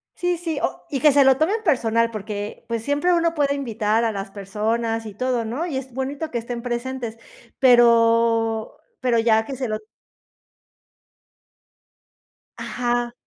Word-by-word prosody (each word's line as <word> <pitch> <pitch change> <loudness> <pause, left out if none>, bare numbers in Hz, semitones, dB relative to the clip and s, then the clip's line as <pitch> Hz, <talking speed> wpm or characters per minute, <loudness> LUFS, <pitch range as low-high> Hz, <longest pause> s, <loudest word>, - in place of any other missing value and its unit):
Sí, 355 0 -1
sí, 330 -2 -3
o - - -3
y 275 - -2
que 300 +3 +6
se 280 0 +5
lo 265 -1 +5
tomen 400 +9 0
personal, 230 - +2
porque, 210 -1 -6
pues, 230 -1 -3
siempre 290 +7 +1
uno 335 -1 +2
puede 285 -3 +1
invitar 225 -4 0
a 230 - +1
las 195 -1 -5
personas 225 +3 -2
y 215 - -7
todo, 245 +1 -1
¿no?, 250 +10 -3
y 310 -7 -3
es 260 -1 -7
bonito 275 +5 -3
que 240 - -2
estén 235 +1 -5
presentes, 240 -1 -4 0.4
pero 230 -2 +4 0.2
pero 250 -2 +1
ya 225 -1 +3
que 270 - -6
se 255 -1 -3
lo 215 -1 -2 2.8
Ajá. 240 -1 -2
240 Hz, 155 wpm, -22 LUFS, 225-275 Hz, 2.8 s, que